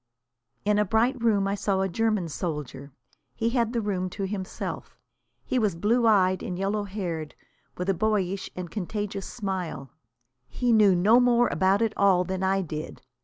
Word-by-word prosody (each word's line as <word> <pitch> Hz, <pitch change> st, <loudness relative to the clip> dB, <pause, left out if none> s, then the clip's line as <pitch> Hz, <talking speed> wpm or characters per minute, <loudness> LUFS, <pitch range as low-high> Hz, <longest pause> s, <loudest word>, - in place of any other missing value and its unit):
In 210 Hz, 0 st, +3 dB
a -, -, +4 dB
bright 230 Hz, +5 st, +1 dB
room 205 Hz, -4 st, +2 dB
I 195 Hz, -, 0 dB
saw 195 Hz, -1 st, 0 dB
a 190 Hz, -, +1 dB
German 215 Hz, -2 st, 0 dB
soldier. 150 Hz, -4 st, -5 dB, 0.4 s
He 230 Hz, +1 st, 0 dB
had 235 Hz, -2 st, +1 dB
the 235 Hz, -2 st, -1 dB
room 185 Hz, -3 st, -2 dB
to 200 Hz, -, -1 dB
himself. 190 Hz, -1 st, -5 dB, 0.5 s
He 255 Hz, -, 0 dB
was 210 Hz, -6 st, +1 dB
blue 230 Hz, +7 st, +2 dB
eyed 185 Hz, -3 st, +3 dB
and 180 Hz, -, -4 dB
yellow 200 Hz, +2 st, -1 dB
haired, 175 Hz, -6 st, -5 dB, 0.4 s
with 180 Hz, -, -3 dB
a 195 Hz, -, +3 dB
boyish 195 Hz, -1 st, -1 dB
and 180 Hz, -2 st, -6 dB
contagious 205 Hz, 0 st, -4 dB
smile. 185 Hz, -, -4 dB, 0.6 s
He 245 Hz, -2 st, +1 dB
knew 210 Hz, -4 st, +5 dB
no 210 Hz, +7 st, +5 dB
more 240 Hz, -1 st, +4 dB
about 195 Hz, +3 st, +2 dB
it 220 Hz, -1 st, 0 dB
all 190 Hz, -3 st, +4 dB
than 190 Hz, 0 st, -4 dB
I 190 Hz, 0 st, +1 dB
did. 155 Hz, -2 st, -7 dB
195 Hz, 170 wpm, -26 LUFS, 185-220 Hz, 0.6 s, knew